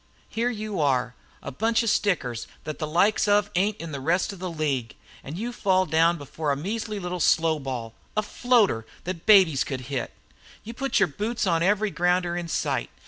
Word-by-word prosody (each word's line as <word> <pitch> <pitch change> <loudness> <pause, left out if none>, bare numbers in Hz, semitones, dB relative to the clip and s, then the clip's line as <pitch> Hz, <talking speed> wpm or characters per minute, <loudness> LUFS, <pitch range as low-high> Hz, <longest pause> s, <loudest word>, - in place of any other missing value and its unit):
Here 235 +2 0
you 215 -5 -4
are, 125 -3 +1 0.3
a - - -5
bunch 225 - +1
of 230 - +1
stickers 130 - 0 0.2
that 155 -1 -6
the 155 - -2
likes 195 +7 +2
of 205 0 +3
ain't 200 +4 +1
in 165 -1 -7
the 140 - -4
rest 175 +8 0
of 195 - -11
the 185 0 -4
league 145 -8 -2 0.3
and 150 +5 -7
you 235 +4 -4
fall 185 -4 +2
down 165 +1 +3
before 145 +1 -3
a - - +1
measly 210 +7 -4
little 180 -1 -4
slow 160 -1 +3
ball, 125 -5 -5 0.2
a 215 - +2
floater 210 - +2 0.2
that 180 0 -6
babies 185 -10 +6
could 130 -2 -4
hit! 130 - -2 0.5
You 230 - -7
put 270 +3 -4
the - - +5
boots 210 +9 -2
on 165 -3 +2
every 205 +3 +2
grounder 175 0 +1
in 175 -1 -3
sight! - - -1
175 Hz, 195 wpm, -25 LUFS, 150-210 Hz, 0.5 s, babies